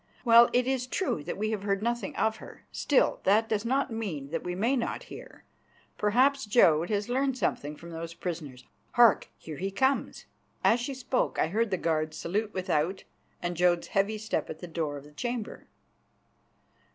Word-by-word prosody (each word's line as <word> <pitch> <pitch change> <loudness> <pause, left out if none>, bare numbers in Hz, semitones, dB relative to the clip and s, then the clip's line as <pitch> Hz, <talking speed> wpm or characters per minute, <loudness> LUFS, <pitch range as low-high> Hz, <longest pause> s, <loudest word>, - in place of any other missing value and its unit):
Well, 235 0 +8
it 245 0 +2
is 260 -1 -1
true 255 - -1
that 175 - -4
we 215 +2 -1
have 215 -3 -2
heard 200 0 -1
nothing 240 +4 -2
of 220 0 +1
her. - - -13
Still, 285 - +2
that 215 +4 +3
does 215 -2 -1
not 265 +1 0
mean 160 -11 -4
that 165 - -2
we 180 0 -3
may 230 +8 +1
not 240 - -2
hear. - - -12 0.5
Perhaps 255 +5 +2
Jodd 170 -7 +4
has 205 -1 -1
learned 265 +1 0
something 150 - -2
from 170 0 -11
those 165 0 -6
prisoners. 150 -8 -6 0.3
Hark! 240 -2 +5
he 165 +5 -5
comes." 265 +7 0 0.4
As 235 - +4
she 265 +3 -4
spoke 255 0 -1
I 155 - +1
heard 220 +5 +1
the 190 - 0
guards 155 -2 -1
salute 205 +7 -2
without 185 -1 -1 0.4
and 175 0 -2
Jodd's 175 0 +2
heavy 200 +2 +1
step 215 0 -2
at - - -6
the - - -8
door 160 -3 -3
of 140 - -10
the 150 - -15
chamber. 240 +6 -5
205 Hz, 180 wpm, -28 LUFS, 170-240 Hz, 0.5 s, Well